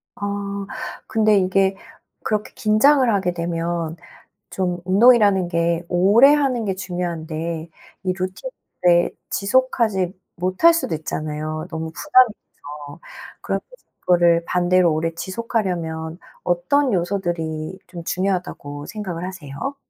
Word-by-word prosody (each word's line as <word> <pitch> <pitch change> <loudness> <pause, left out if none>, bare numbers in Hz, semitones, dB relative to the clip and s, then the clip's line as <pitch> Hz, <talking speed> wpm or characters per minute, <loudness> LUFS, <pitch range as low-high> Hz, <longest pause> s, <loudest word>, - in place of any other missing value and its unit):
아. 200 0 -4 0.4
근데 215 -2 +3
이게 190 0 +2 0.5
그렇게 210 -1 -2
긴장을 255 +6 +4
하게 190 -3 0
되면 170 -1 -3 0.5
좀 180 -2 -2
운동이라는 200 -2 +5
게 170 0 0
오래 205 +11 +6
하는 265 -6 +1
게 195 -2 -1
중요한데 170 -3 -4 0.3
이 185 -1 0
루틴을 185 - 0 0.2
지속하지 210 -4 +1 0.2
못할 185 - +4
수도 330 - -1
있잖아요, 155 0 -4
너무 160 -1 -5
부담이 255 - +4
돼서. 145 -2 -12 0.4
그러면서 195 0 -3 0.3
그거를 170 -1 +3
반대로 180 -1 +3
오래 165 +2 -1
지속하려면 175 -5 -3 0.3
어떤 225 +11 +1
요소들이 175 -3 -2
좀 175 -1 -9
중요하다고 175 -6 -3
생각을 185 -5 -5
하세요? 185 - -6
180 Hz, 270 characters per minute, -21 LUFS, 170-205 Hz, 0.5 s, 오래